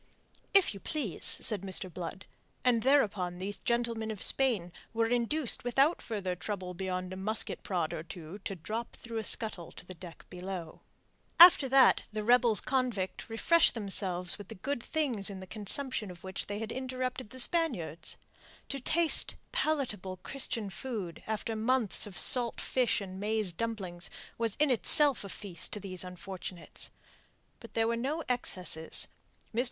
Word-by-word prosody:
"If 390 - +4
you 200 - -9
please," 260 - -4
said 210 -5 +3
Mr. 190 -2 -2
Blood, 180 +2 -7 0.4
and 240 -2 +3
thereupon 205 -10 +1
those 195 +3 -5
gentlemen 235 -2 -1
of 215 -3 -5
Spain 225 -11 +2 0.2
were 230 0 +2
induced 245 +4 +1
without 270 +7 +2
further 195 -5 -4
trouble 180 +1 -5
beyond 185 0 -4
a - - -6
musket 215 +4 -2
prod 175 -5 -2
or - - -4
two 165 +3 -10
to 195 0 -6
drop 220 +7 -6
through 230 -1 -6
a - - -4
scuttle 210 -7 +2
to - - -11
the 185 - -9
deck 175 -1 -12
below. 180 -2 -7 0.6
After 335 -6 +9
that 265 0 +5
the 215 0 -4
rebels 240 -1 +4
convict 245 -9 -2
refreshed 330 +9 +3
themselves 190 -4 +2
with 205 - -10
the - - -9
good 265 +6 -4
things 250 -10 +2
in 195 -2 -7
the 190 - -9
consumption 215 +3 0
of 175 -1 -12
which 190 0 -6
they 205 - -4
had 225 +1 -5
interrupted 255 -2 -4
the 260 - -11
Spaniards. 240 - -1 0.5
To 275 - -4
taste 320 +5 +7 0.2
palatable 225 -12 -2
Christian 230 -6 -3
food 210 -9 -6
after 220 +1 -3
months 225 -2 +1
of 195 - -9
salt 240 -2 +3
fish 250 -4 0
and 190 -1 -8
maize 210 -2 0
dumplings 190 -4 -4 0.3
was 230 -3 0
in 300 -2 +2
itself 275 +2 +4
a 200 - -8
feast 185 -4 -5
to 210 - -3
these 185 -2 -3
unfortunates. 180 -1 -7 0.7
But - - -14
there 225 0 +2
were 235 - 0
no 280 +7 -3
excesses. 180 -9 -1 0.5
Mr. 230 - -1
215 Hz, 160 wpm, -30 LUFS, 185-250 Hz, 0.7 s, After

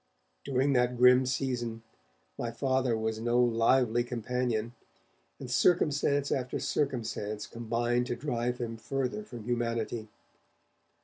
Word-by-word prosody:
During 135 +1 +1
that 125 -1 +2
grim 125 +1 +6
season, 120 -4 -2 0.5
my 115 - -3
Father 130 -1 0
was 110 0 -2
no 120 +2 +1
lively 120 0 +3
companion, 120 -1 -2 0.7
and 130 -3 -7
circumstance 145 -2 +2
after 125 -1 -1
circumstance 110 -6 -2
combined 120 +1 -1
to 120 - -2
drive 120 -2 -2
him 115 -2 -4
further 135 - -3
from 120 - -9
humanity. 115 -1 -2
120 Hz, 115 wpm, -30 LUFS, 115-130 Hz, 0.7 s, grim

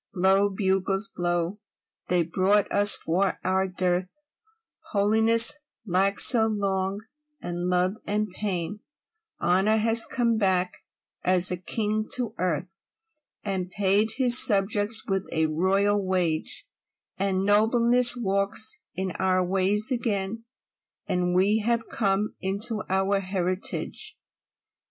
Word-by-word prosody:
Blow, 195 +2 +2
bugles, 195 +1 -1
blow! 175 +2 -2 0.5
They 180 -1 +1
brought 190 +5 0
us, 205 0 +5
for 185 +3 -1
our 190 +1 0
dearth, 180 0 -1 0.8
Holiness, 220 +3 +4 0.3
lacked 195 +1 +1
so 225 -3 +5
long, 195 -2 -2 0.4
and 175 -2 -4
Love, 180 +3 0
and 210 +1 -1
Pain, 185 -1 -4 0.6
Honour 190 +5 +1
has 225 +1 +2
come 235 -3 0
back, 185 -3 -1 0.4
as 185 0 +3
a - - 0
king, 215 +4 -3
to 240 -4 -3
earth, 180 +1 -2 0.7
And 190 -3 -4
paid 205 +2 0
his 250 -2 +5
subjects 205 +1 +2
with 195 -1 -3
a 160 -1 0
royal 195 +6 0
wage; 180 -4 -2 0.5
And 195 -1 -1
Nobleness 235 +4 +4
walks 200 - +1 0.2
in 190 0 -3
our 185 -1 +1
ways 195 +5 0
again; 225 -2 -2 0.6
And 180 0 -1
we 200 +4 +2
have 230 +1 -2
come 200 0 -1
into 210 +3 -1
our 190 +1 0
heritage. 190 - -4
195 Hz, 115 wpm, -25 LUFS, 185-215 Hz, 0.8 s, us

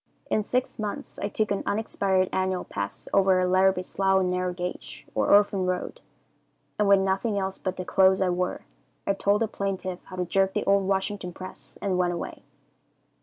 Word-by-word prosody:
"In 215 - +3
six 250 +3 -2
months 210 -1 -5
I - - -1
took 215 0 -1
an 200 - 0
unexpired 195 -3 +1
annual 185 -1 0
pass 100 0 -5
over 190 -1 +4
our 185 - +2
Larrabie 185 0 +3
Slough 190 0 +2
Narrow 180 0 0
Gauge, 180 0 -6
or - - +1
Orphan 200 -2 +4
Road, 185 - -3 0.8
and 210 - +3
with 200 -1 +6
nothing 195 +3 0
else 190 -1 -2
but 185 - -3
the 185 - -4
clothes 190 0 +4
I 190 -1 +2
wore, 180 +1 -1 0.4
I 200 - +2
told 200 +2 +2
the - - 0
plaintiff 190 -3 -3
how 185 - -9
to 180 0 -1
jerk 190 +2 +1
the - - +1
old 195 -1 +3
Washington 195 -1 -1
press 185 +1 -10
and 190 -2 0
went 175 -1 +2
away. 170 - -6
190 Hz, 185 wpm, -26 LUFS, 185-200 Hz, 0.8 s, with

